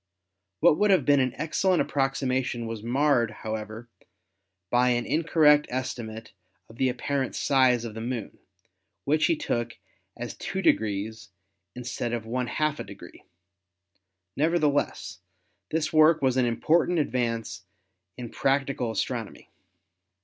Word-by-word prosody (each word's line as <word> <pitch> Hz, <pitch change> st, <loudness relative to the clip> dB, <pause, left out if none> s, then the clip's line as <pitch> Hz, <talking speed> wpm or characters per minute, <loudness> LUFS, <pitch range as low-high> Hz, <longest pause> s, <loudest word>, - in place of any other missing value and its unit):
What 160 Hz, -1 st, +5 dB
would 210 Hz, -, +3 dB
have 185 Hz, -9 st, +4 dB
been 145 Hz, -1 st, +5 dB
an 130 Hz, -1 st, 0 dB
excellent 175 Hz, +4 st, +1 dB
approximation 130 Hz, -3 st, -1 dB
was 115 Hz, -1 st, -5 dB
marred, 120 Hz, 0 st, +2 dB
however, 110 Hz, +1 st, -6 dB, 0.8 s
by 125 Hz, +1 st, +4 dB
an 120 Hz, -1 st, +1 dB
incorrect 150 Hz, -2 st, +4 dB
esti 125 Hz, -1 st, -3 dB
mate 110 Hz, 0 st, -9 dB, 0.4 s
of 115 Hz, -, -15 dB
the 130 Hz, +1 st, +2 dB
apparent 130 Hz, +2 st, -2 dB
size 130 Hz, -3 st, +3 dB
of 110 Hz, -, -6 dB
the 110 Hz, -, -7 dB
Moon, 120 Hz, -2 st, -5 dB, 0.7 s
which 155 Hz, +2 st, +2 dB
he 165 Hz, -, +2 dB
took 120 Hz, -5 st, -3 dB, 0.4 s
as -, -, -5 dB
two -, -, -4 dB
degrees 110 Hz, +1 st, 0 dB, 0.5 s
instead 120 Hz, -1 st, -4 dB
of 115 Hz, -2 st, -3 dB
one 125 Hz, +2 st, -2 dB
half 155 Hz, +2 st, -1 dB
a -, -, -3 dB
degree. 100 Hz, -3 st, -13 dB, 1.1 s
Nevertheless 150 Hz, -1 st, 0 dB, 0.5 s
this 160 Hz, 0 st, -1 dB
work 155 Hz, +1 st, +6 dB
was 130 Hz, -2 st, +1 dB
an 130 Hz, -2 st, +2 dB
important 165 Hz, +9 st, +2 dB
advance 115 Hz, -, -1 dB, 0.6 s
in 120 Hz, -2 st, -6 dB
practical 135 Hz, -3 st, 0 dB
as 110 Hz, -, 0 dB
tronomy. -, -, -7 dB
125 Hz, 135 wpm, -26 LUFS, 115-150 Hz, 1.1 s, work